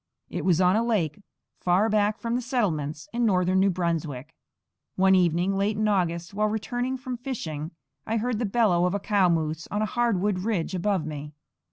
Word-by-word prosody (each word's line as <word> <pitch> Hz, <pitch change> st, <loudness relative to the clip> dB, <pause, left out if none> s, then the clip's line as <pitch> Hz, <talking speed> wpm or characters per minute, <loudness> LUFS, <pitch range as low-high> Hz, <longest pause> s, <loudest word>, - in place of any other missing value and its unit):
It -, -, -3 dB
was 180 Hz, -3 st, +3 dB
on 180 Hz, +1 st, +4 dB
a 225 Hz, -, +2 dB
lake, 205 Hz, -8 st, 0 dB, 0.4 s
far 185 Hz, +4 st, +2 dB
back 210 Hz, -1 st, +2 dB
from 230 Hz, 0 st, -3 dB
the 245 Hz, -, 0 dB
settlements, 160 Hz, -, -2 dB
in 240 Hz, +1 st, 0 dB
northern 185 Hz, -3 st, +3 dB
New 195 Hz, +1 st, +4 dB
Brunswick. 165 Hz, -5 st, -2 dB, 0.6 s
One 190 Hz, 0 st, +4 dB
evening, 180 Hz, +1 st, +2 dB
late 200 Hz, +2 st, 0 dB
in 215 Hz, 0 st, +1 dB
August, 175 Hz, -3 st, 0 dB
while 210 Hz, +1 st, +1 dB
returning 245 Hz, +5 st, -2 dB
from 255 Hz, -1 st, -5 dB
fishing, 165 Hz, -, -5 dB, 0.4 s
I 225 Hz, -, 0 dB
heard 230 Hz, 0 st, -1 dB
the 240 Hz, -, 0 dB
bellow 195 Hz, -5 st, +3 dB
of 180 Hz, +2 st, 0 dB
a -, -, 0 dB
cow 200 Hz, -2 st, +2 dB
moose 160 Hz, -1 st, -1 dB
on 210 Hz, +2 st, -1 dB
a -, -, +2 dB
hardwood 210 Hz, -4 st, 0 dB
ridge 190 Hz, -3 st, -1 dB
above 185 Hz, -2 st, 0 dB
me. 150 Hz, -1 st, -6 dB
195 Hz, 190 wpm, -26 LUFS, 170-220 Hz, 0.6 s, on